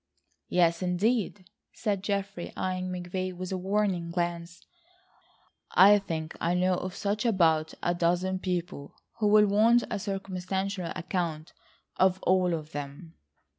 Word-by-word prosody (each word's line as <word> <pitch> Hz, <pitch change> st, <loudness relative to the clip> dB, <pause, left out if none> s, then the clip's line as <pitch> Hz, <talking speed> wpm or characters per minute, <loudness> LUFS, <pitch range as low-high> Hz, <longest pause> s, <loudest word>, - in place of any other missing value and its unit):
"Yes, 170 Hz, -1 st, +2 dB
indeed," 195 Hz, +1 st, 0 dB, 0.3 s
said 205 Hz, -4 st, -2 dB
Geoffrey, 200 Hz, -3 st, -3 dB
eyeing 185 Hz, 0 st, -2 dB
McVay 185 Hz, +1 st, -4 dB
with 185 Hz, +1 st, -6 dB
a 190 Hz, -, -1 dB
warning 190 Hz, -3 st, 0 dB
glance, 170 Hz, -1 st, -3 dB, 1.1 s
"I 205 Hz, +3 st, +8 dB
think 160 Hz, -5 st, -5 dB
I 170 Hz, +1 st, +1 dB
know 185 Hz, +1 st, +2 dB
of 180 Hz, +1 st, -4 dB
just 205 Hz, +1 st, -1 dB
about 165 Hz, -8 st, +2 dB
a 175 Hz, -, +2 dB
dozen 175 Hz, +2 st, 0 dB
people 175 Hz, -6 st, -4 dB, 0.2 s
who 215 Hz, -, +2 dB
will 210 Hz, 0 st, +6 dB
want 220 Hz, +4 st, +4 dB
a -, -, -1 dB
circumstantial 195 Hz, -1 st, -3 dB
account 170 Hz, -3 st, -3 dB, 0.4 s
of 190 Hz, 0 st, +3 dB
all 185 Hz, -2 st, +3 dB
of 155 Hz, -1 st, -7 dB
them." 145 Hz, +3 st, -7 dB
185 Hz, 130 wpm, -28 LUFS, 170-195 Hz, 1.1 s, I